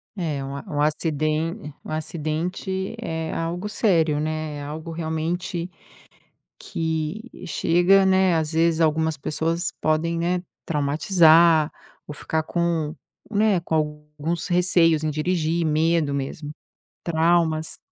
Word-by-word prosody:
É, 155 -8 -2
um 135 +1 -6
a 140 - -6
um 145 -1 -2
aciden 155 +3 -1
um - - -8
acidente 170 +6 -3
é 160 -7 -3
algo 175 +5 -3
sério, 165 -9 +2
né, 155 -1 -3
é 145 - -6
algo 155 +3 -6
realmente 165 +2 -3 0.9
que 160 +8 -4
chega 180 +3 +3
né, 190 -1 +4
às 160 0 -1
vezes, 165 0 +2
algumas 160 0 +2
pessoas 165 +5 -2
podem, 160 +2 +1
né, 175 +1 0 0.2
traumatizar 160 +1 +4 0.4
ou 150 - -7
ficar 160 +2 -2
com 165 -2 -1 0.4
né, 210 -3 +2
com 165 - -3
alguns 150 +1 -2
receios 175 -3 +3
em 155 - +1
dirigir, 165 +1 0
medo 155 -1 +2
mesmo, 140 +2 -4 0.5
traumas. 160 -1 +1
160 Hz, 120 wpm, -23 LUFS, 155-170 Hz, 0.9 s, né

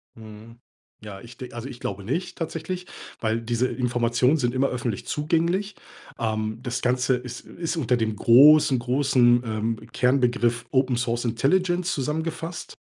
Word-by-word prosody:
Mhm. 110 +1 -13 0.4
Ja, 100 -2 -9
ich 115 0 -13
de 125 -1 -9
also 120 +3 -6
ich 125 - -10
glaube 100 0 -5
nicht, 175 - -3
tatsächlich, 165 +2 -4 0.4
weil 110 0 0
diese 120 +2 0
Informationen 125 +2 +1
sind 120 -5 0
immer 135 +1 +2
öffentlich 120 -5 -4
zugänglich. 170 +6 0 0.4
Ähm, 110 0 -2
das 125 -1 -3
Ganze 125 +1 +1
ist 125 -1 -7
ist 170 0 -4
unter 125 -5 +1
dem 110 -2 -1
großen, 140 +4 +6
großen, 125 -1 +3
ähm, 110 +1 -2 0.2
Kernbegriff 125 -2 +1
Open 130 -2 +2
Source 120 0 -1
Intelligence 175 +10 +1
zusammengefasst, 160 +4 -4
125 Hz, 145 wpm, -24 LUFS, 115-150 Hz, 0.4 s, großen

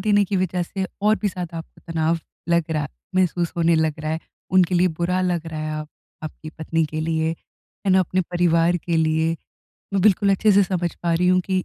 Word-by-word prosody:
देने 205 0 +3
की 195 0 -1
वजह 180 -1 0
से 190 +2 -3 0.2
और 215 +1 +4
भी 210 - +2
ज़्यादा 175 -3 -5
आपको 165 - -11
तनाव 165 +1 +1 0.3
लग 170 -1 +2
रहा 155 -2 0
है 145 - -4 0.3
महसूस 175 -2 +1
होने 170 0 +3
लग 160 -1 0
रहा 155 0 -3
है 160 - -2 0.4
उनके 180 0 +4
लिए 180 +1 +4
बुरा 180 +2 +1
लग 175 -3 -1
रहा 155 -1 -5
है 155 - -3
आप 150 - -8 0.3
आपकी 155 0 -7
पत्नी 160 +1 0
के 155 +1 -4
लिए 160 0 0 0.6
है - - +3
ना? 190 - +6
अपने 185 0 0
परिवार 175 -1 +2
के 170 0 -2
लिए। 160 +1 +1 0.6
मैं 195 - +2
बिल्कुल 200 0 +4
अच्छे 210 +2 +4
से 200 +1 +6
समझ 175 -2 -2
पा 170 -1 +1
रही 180 +2 +2
हूँ 185 0 +4
कि 185 -1 0
170 Hz, 220 wpm, -22 LUFS, 160-185 Hz, 0.6 s, ना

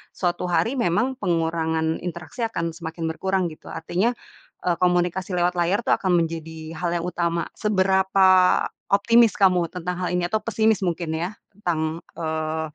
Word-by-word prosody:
suatu 175 -1 -1
hari 230 +9 +1
memang 245 +3 +1
pengurangan 160 -3 0
interaksi 175 +7 -5
akan 170 -7 -2
semakin 165 0 -5
berkurang, 190 +2 0
gitu, 155 - -14
artinya, 185 +8 0 0.5
eee, 175 -1 +2
komunikasi 180 +1 +1
lewat 175 +1 +2
layar 175 +4 +2
tuh - - +4
akan 175 -3 +2
menjadi 160 0 -7
hal 175 0 -1
yang 170 0 -2
utama. 170 -1 -1
Seberapa 190 -2 +3 0.6
optimis 225 +2 +5
kamu 180 -3 +4
tentang 180 0 -3
hal - - -1
ini, 180 -1 +1
atau 220 - +1
pesimis 220 -2 +2
mungkin 170 -2 -2
ya, 180 +5 -3 0.2
tentang, 165 -4 -2 0.2
eee, 160 0 -2
175 Hz, 150 wpm, -23 LUFS, 165-190 Hz, 0.6 s, optimis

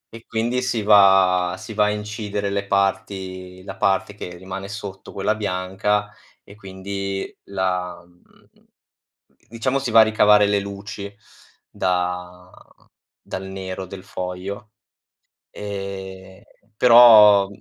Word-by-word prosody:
e 115 - -13
quindi 120 +2 -1
si 120 -4 -2
va 95 -3 +5
si 110 - -9
va 105 0 +2
a 105 - +1
incidere 105 -1 -4
le 100 0 -3
parti, 95 -2 -2
la - - -8
parte 95 0 0
che 90 -3 -8
rimane 95 +2 -7
sotto 100 -2 -8
quella 100 +2 -1
bianca 105 +1 -2 0.3
e 100 - -15
quindi 100 0 -6
la 90 -2 -3
mhmm 90 0 -27 1.0
diciamo 120 +4 -1
si 130 -3 -4
va 115 - +7
a 110 - +9
ricavare 105 -1 +4
le 100 0 +1
luci 100 0 -8 0.6
da 90 0 -3 0.7
dal 95 - -7
nero 95 0 -6
del 95 0 -11
foglio. 95 +4 -6 0.8
E 95 -2 -8 0.3
però 110 -4 +8
100 Hz, 120 wpm, -21 LUFS, 95-105 Hz, 1.0 s, a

